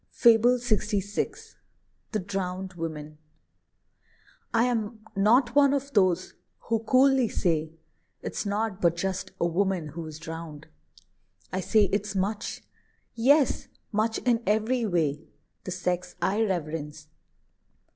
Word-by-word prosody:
FABLE 235 Hz, +1 st, +5 dB
LXVI. 210 Hz, -4 st, -2 dB, 0.6 s
THE 220 Hz, -, 0 dB
DROWNED 190 Hz, -1 st, -4 dB
WOMAN. 155 Hz, -3 st, -6 dB, 1.3 s
I 230 Hz, 0 st, +3 dB
am 225 Hz, -2 st, -1 dB
not 235 Hz, +5 st, +4 dB
one 285 Hz, -1 st, +5 dB
of 280 Hz, 0 st, -4 dB
those 185 Hz, -3 st, +2 dB, 0.3 s
who 230 Hz, -1 st, 0 dB
coolly 260 Hz, +2 st, +4 dB
say, 160 Hz, -3 st, 0 dB, 0.5 s
"It's -, -, -3 dB
nought 205 Hz, -1 st, -2 dB
but 170 Hz, -1 st, +3 dB
just 190 Hz, +2 st, -2 dB
a -, -, +2 dB
woman 180 Hz, -2 st, 0 dB
who 160 Hz, +2 st, -7 dB
is 155 Hz, -1 st, -8 dB
drowned!" 160 Hz, -2 st, -8 dB, 0.9 s
I 185 Hz, -, 0 dB
say 210 Hz, +4 st, +3 dB
it's 205 Hz, 0 st, -1 dB
much, 205 Hz, +2 st, -2 dB, 0.5 s
yes, 270 Hz, +4 st, +3 dB, 0.2 s
much 220 Hz, +1 st, +1 dB
in 240 Hz, -2 st, +3 dB
every 220 Hz, +3 st, +1 dB
way. 155 Hz, -6 st, 0 dB, 0.4 s
The 185 Hz, -, -4 dB
sex 180 Hz, 0 st, -2 dB
I 205 Hz, +4 st, +1 dB
reverence. 155 Hz, -5 st, -3 dB
200 Hz, 120 wpm, -27 LUFS, 170-225 Hz, 1.3 s, FABLE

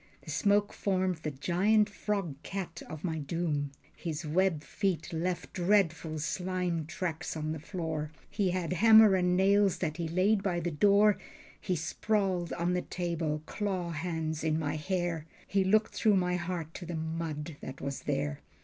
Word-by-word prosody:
The 155 Hz, -, -7 dB
smoke 200 Hz, +7 st, +2 dB
formed 185 Hz, -3 st, 0 dB
the 155 Hz, -1 st, -4 dB
giant 185 Hz, +9 st, +2 dB
frog 195 Hz, -7 st, -3 dB
cat 195 Hz, 0 st, -5 dB
of 155 Hz, -1 st, -7 dB
my 160 Hz, -3 st, -1 dB
doom. 145 Hz, -1 st, -1 dB, 0.2 s
His 165 Hz, -1 st, -4 dB
web 165 Hz, 0 st, +1 dB
feet 185 Hz, -2 st, -2 dB
left 175 Hz, +2 st, -2 dB
dreadful 175 Hz, -4 st, +2 dB
slime 180 Hz, 0 st, -2 dB
tracks 170 Hz, -1 st, -3 dB
on 155 Hz, 0 st, -2 dB
the 160 Hz, -, -4 dB
floor. 160 Hz, -3 st, -3 dB, 0.2 s
He 195 Hz, -3 st, 0 dB
had 180 Hz, -1 st, -1 dB
hammer 220 Hz, +2 st, +8 dB
and 180 Hz, -1 st, +3 dB
nails 200 Hz, 0 st, +4 dB
that 155 Hz, -3 st, -2 dB
he 170 Hz, -2 st, -2 dB
laid 190 Hz, +5 st, +2 dB
by 180 Hz, -3 st, 0 dB
the 175 Hz, 0 st, -2 dB
door. 200 Hz, +6 st, +4 dB, 0.4 s
He 185 Hz, -, -1 dB
sprawled 185 Hz, +1 st, 0 dB
on 175 Hz, +1 st, 0 dB
the 180 Hz, -, +1 dB
table, 165 Hz, -4 st, -2 dB
claw 185 Hz, -4 st, -2 dB
hands 160 Hz, -1 st, -3 dB
in 155 Hz, -1 st, +1 dB
my 150 Hz, -1 st, -1 dB
hair. 170 Hz, -1 st, -2 dB, 0.2 s
He 195 Hz, -1 st, +2 dB
looked 215 Hz, +3 st, +3 dB
through 215 Hz, -2 st, +3 dB
my 180 Hz, -1 st, +1 dB
heart 175 Hz, -2 st, -3 dB
to 175 Hz, -, -7 dB
the 170 Hz, -, -4 dB
mud 160 Hz, -1 st, -4 dB
that 130 Hz, +1 st, -7 dB
was 140 Hz, 0 st, -4 dB
there. 75 Hz, -2 st, -1 dB
175 Hz, 165 wpm, -31 LUFS, 160-190 Hz, 0.4 s, hammer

